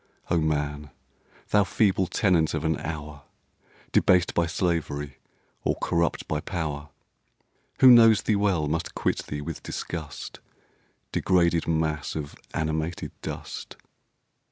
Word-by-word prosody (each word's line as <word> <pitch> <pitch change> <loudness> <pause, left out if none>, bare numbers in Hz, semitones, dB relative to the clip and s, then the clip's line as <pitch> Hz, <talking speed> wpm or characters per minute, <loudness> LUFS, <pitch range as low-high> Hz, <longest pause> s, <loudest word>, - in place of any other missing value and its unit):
Oh, 85 - +4
man! 75 -1 -1 0.6
thou 105 -1 +4
feeble 95 -2 +2
tenant 85 -4 +2
of 80 0 -3
an 80 0 +2
hour, 75 -2 -6 0.7
Debased 90 -1 +4
by 85 -1 +2
slavery 75 -6 -2 0.4
or - - +1
corrupt 85 0 -1
by 75 - -1
power, 75 -3 -4 0.9
Who 130 - +10
knows 115 -3 +7
thee 110 - +2
well 95 -7 +1
must 80 +3 -2
quit - - -1
thee 75 0 -4
with 80 +1 -6
disgust, 80 -4 -6 0.7
Degraded 85 -3 +2
mass 80 -2 -1
of 75 -2 -5 0.2
animated 80 +2 -2
dust! - - -7
80 Hz, 120 wpm, -26 LUFS, 75-90 Hz, 0.9 s, Who